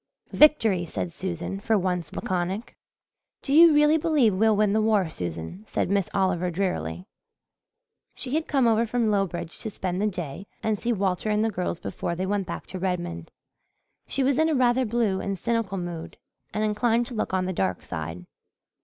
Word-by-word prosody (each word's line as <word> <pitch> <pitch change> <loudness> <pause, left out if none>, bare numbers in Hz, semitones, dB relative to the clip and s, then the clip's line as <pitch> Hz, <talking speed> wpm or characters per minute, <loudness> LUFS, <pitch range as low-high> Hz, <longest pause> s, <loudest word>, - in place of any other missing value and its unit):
"Victory!" 225 -12 +5
said 170 +1 -4
Susan, 175 +2 -4
for 220 +2 +2
once 180 -3 -1
laconic. 185 +5 -3 0.7
"Do 275 - -1
you 330 +2 +9
really 300 +1 +5
believe 290 -9 +3
we'll 220 +3 +3
win 205 -1 +2
the 220 - +3
war, 215 -4 +2
Susan?" 85 - -5
said - - -1
Miss 200 -3 +1
Oliver 185 -2 +1
drearily. 95 - -2 1.1
She 255 - -4
had 315 +1 0
come 270 -4 +2
over 230 0 +3
from 230 -1 +1
Lowbridge 180 -4 -2
to 220 - -4
spend 185 -2 -3
the 210 - +2
day 180 -1 -5 0.2
and 215 -2 0
see 240 - -1
Walter 195 -1 0
and 210 +1 +2
the 225 - 0
girls 180 -3 -3
before 170 - -4
they 185 +2 -2
went 195 -1 -1
back 170 - -5
to 185 - -7
Redmond. 175 - -3 0.8
She 275 - +1
was 270 +1 +2
in 320 0 +3
a 310 - +1
rather 255 0 +3
blue 215 -4 0
and 195 -1 -3
cynical 225 -3 -1
mood 175 -2 -6 0.3
and 215 - -1
inclined 225 +2 +1
to 245 - -8
look 220 - -2
on 185 -1 0
the 185 - -2
dark 95 - -1
side. 85 +2 -6
195 Hz, 185 wpm, -26 LUFS, 175-230 Hz, 1.1 s, you